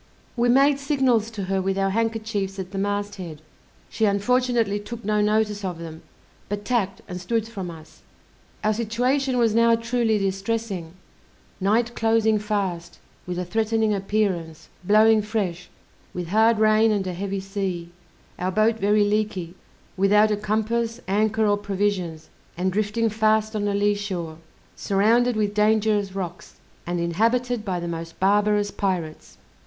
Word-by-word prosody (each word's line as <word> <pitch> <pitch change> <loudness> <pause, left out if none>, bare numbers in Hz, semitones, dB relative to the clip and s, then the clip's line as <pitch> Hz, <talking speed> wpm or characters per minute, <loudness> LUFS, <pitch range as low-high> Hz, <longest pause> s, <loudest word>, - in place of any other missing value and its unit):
We 240 0 +2
made 275 +3 +4
signals 265 -6 +1
to 215 -4 -5
her 190 0 -1
with 195 +1 -1
our 195 0 +1
handkerchiefs 220 -3 -2
at 190 -1 -6
the 195 - -4
mast 205 +1 -2
head, 165 -5 -7 0.5
she 220 - 0
unfortunately 225 +1 +1
took 230 +2 -8
no 210 0 +1
notice 210 -1 +1
of 180 -3 -3
them, 165 -1 -9 0.5
but 205 0 -4
tacked 205 -5 -1
and 180 0 -6
stood 225 +4 -1
from 195 -6 -6
us. 160 -1 -13 0.6
Our 215 - +2
situation 250 +4 0
was 230 -3 +3
now 230 0 +5
truly 230 -1 0
distressing, 195 -3 -2 0.7
night 230 +5 +1
closing 225 -1 +2
fast, 195 -5 -3 0.3
with 180 -1 -3
a 180 - -2
threatening 220 +2 +1
appearance, 185 -6 -2
blowing 215 +3 +5
fresh, 195 -5 -3 0.5
with 175 -2 -4
hard 220 +3 +4
rain 215 +1 +4
and 200 -2 0
a 185 - -3
heavy 195 +2 -3
sea; 190 -3 -4 0.5
our 185 +1 -1
boat 215 +3 +2
very 210 +1 +3
leaky, 205 -5 -1 0.4
without 210 +3 +4
a - - +2
compass, 220 +3 -1
anchor 215 +3 +1
or 205 -1 +3
provisions, 195 -5 -2 0.3
and 185 +1 0
drifting 215 +3 0
fast 215 0 +1
on 205 -1 -1
a 200 - 0
lee 205 +1 +2
shore, 180 -6 -5 0.4
surrounded 230 +5 +2
with 210 -1 0
dangerous 210 -2 +2
rocks, 180 -2 -6 0.3
and 175 0 -1
inhabited 230 +7 0
by 185 -4 -2
the 170 - -4
most 165 0 -6
barbarous 205 +1 +2
pirates. 180 -7 -3
205 Hz, 150 wpm, -24 LUFS, 190-225 Hz, 0.7 s, now